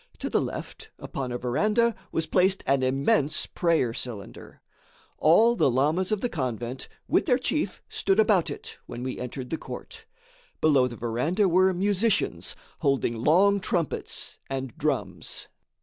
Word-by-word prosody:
To -, -, -4 dB
the -, -, +3 dB
left, -, -, -6 dB
upon 130 Hz, -2 st, -5 dB
a 120 Hz, -, -2 dB
verandah, 210 Hz, -, +2 dB, 0.2 s
was 165 Hz, -, -1 dB
placed 190 Hz, +4 st, +2 dB
an 135 Hz, 0 st, +2 dB
immense 135 Hz, +3 st, +1 dB
prayer 165 Hz, -9 st, +1 dB
cylinder. 115 Hz, -5 st, -8 dB, 0.6 s
All 220 Hz, +10 st, +5 dB
the 140 Hz, -, +3 dB
lamas 155 Hz, -, +1 dB
of 210 Hz, -2 st, 0 dB
the -, -, +1 dB
convent, 125 Hz, -, -4 dB, 0.2 s
with -, -, +2 dB
their 250 Hz, -4 st, +4 dB
chief, 300 Hz, +4 st, -2 dB
stood 390 Hz, +2 st, 0 dB
about 440 Hz, -, +4 dB
it, 450 Hz, +1 st, -8 dB
when 120 Hz, -, -6 dB
we 130 Hz, -, -4 dB
entered 125 Hz, +1 st, -6 dB
the 160 Hz, -, -2 dB
court. -, -, -9 dB, 0.5 s
Below 140 Hz, -5 st, +4 dB
the 120 Hz, -, -7 dB
verandah 125 Hz, -, 0 dB
were 185 Hz, +2 st, +4 dB
musicians, 200 Hz, +3 st, 0 dB, 0.2 s
holding 135 Hz, -4 st, +1 dB
long 185 Hz, -, +4 dB
trumpets 175 Hz, -4 st, -2 dB
and 135 Hz, -1 st, -4 dB
drums. 125 Hz, -, -3 dB
155 Hz, 150 wpm, -26 LUFS, 125-195 Hz, 0.6 s, All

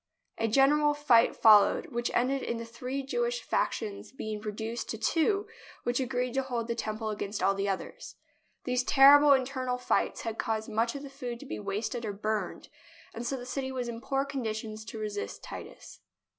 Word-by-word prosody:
A 225 Hz, -, +1 dB
general 290 Hz, +5 st, +4 dB
fight 245 Hz, -6 st, +4 dB
fol 215 Hz, -2 st, +8 dB
lowed, -, -, 0 dB
which 240 Hz, 0 st, -1 dB
ended 265 Hz, +3 st, +1 dB
in 235 Hz, -, -3 dB
the 230 Hz, -, -5 dB
three 250 Hz, +4 st, -5 dB
Jewish 480 Hz, -, -1 dB
factions 210 Hz, -3 st, -2 dB
be 220 Hz, -4 st, -6 dB
ing 210 Hz, -, -5 dB
reduced 220 Hz, +2 st, -4 dB
to 225 Hz, -, -3 dB
two 340 Hz, -, +1 dB, 0.4 s
which 240 Hz, +1 st, 0 dB
agreed 250 Hz, -1 st, -1 dB
to 270 Hz, -, +1 dB
hold 245 Hz, -3 st, -3 dB
the 235 Hz, -, 0 dB
Tem 215 Hz, -2 st, -3 dB
ple 220 Hz, -1 st, -3 dB
against 205 Hz, 0 st, -4 dB
all 195 Hz, 0 st, +2 dB
others. 195 Hz, -1 st, -5 dB, 0.5 s
These 250 Hz, 0 st, 0 dB
terrible 285 Hz, +2 st, +8 dB
internal 260 Hz, -1 st, 0 dB
fights 250 Hz, -, 0 dB
had 225 Hz, -1 st, -5 dB
caused 220 Hz, -1 st, -2 dB
much 225 Hz, +3 st, 0 dB
of 280 Hz, -, -6 dB
the 280 Hz, -, -8 dB
food 245 Hz, -4 st, -6 dB
to -, -, -9 dB
be 105 Hz, -, -5 dB
wasted 215 Hz, -, -3 dB
or 210 Hz, -2 st, -3 dB
burned, 215 Hz, +1 st, -3 dB, 0.5 s
and 235 Hz, +1 st, -5 dB
so 270 Hz, -, -1 dB
the 245 Hz, -, -8 dB
city 265 Hz, +1 st, -3 dB
was 250 Hz, -2 st, -3 dB
in 235 Hz, -1 st, -6 dB
poor 270 Hz, +1 st, 0 dB
condition 220 Hz, -5 st, -4 dB
to 220 Hz, +1 st, -8 dB
resist 210 Hz, -1 st, -5 dB
Titus. -, -, -10 dB
240 Hz, 195 wpm, -29 LUFS, 220-270 Hz, 0.5 s, fol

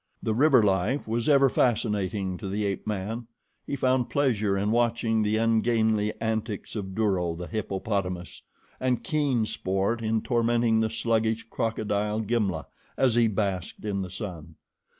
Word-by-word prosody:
The 110 Hz, -, 0 dB
river 130 Hz, 0 st, +5 dB
life 100 Hz, +8 st, +1 dB
was 115 Hz, +4 st, 0 dB
ever 140 Hz, -2 st, +6 dB
fascinating 105 Hz, -6 st, 0 dB
to 100 Hz, -, -5 dB
the 105 Hz, +2 st, -1 dB
ape 100 Hz, +1 st, -3 dB
man. 110 Hz, +3 st, -3 dB, 0.4 s
He -, -, -2 dB
found 130 Hz, -2 st, +1 dB
pleasure 110 Hz, -9 st, +1 dB
in 100 Hz, +2 st, 0 dB
watching 115 Hz, -1 st, +1 dB
the 105 Hz, +1 st, +1 dB
ungainly 110 Hz, -1 st, +2 dB
antics 110 Hz, -2 st, -3 dB
of 95 Hz, -3 st, -5 dB
Duro, 95 Hz, -6 st, +1 dB
the 90 Hz, +1 st, -6 dB
hippopotamus, 95 Hz, -3 st, -3 dB, 0.4 s
and 125 Hz, -2 st, 0 dB
keen 145 Hz, -9 st, +1 dB
sport 95 Hz, +3 st, -1 dB
in 110 Hz, 0 st, 0 dB
tormenting 115 Hz, -1 st, +2 dB
the 110 Hz, 0 st, +1 dB
sluggish 115 Hz, 0 st, 0 dB
crocodile, 105 Hz, -1 st, -1 dB
Gimla, 105 Hz, -7 st, -1 dB, 0.3 s
as 130 Hz, -3 st, +3 dB
he 120 Hz, 0 st, +4 dB
basked 100 Hz, -3 st, -2 dB
in 100 Hz, -2 st, -1 dB
the 95 Hz, -, -5 dB
sun. 90 Hz, -5 st, -7 dB
110 Hz, 150 wpm, -27 LUFS, 100-115 Hz, 0.4 s, ever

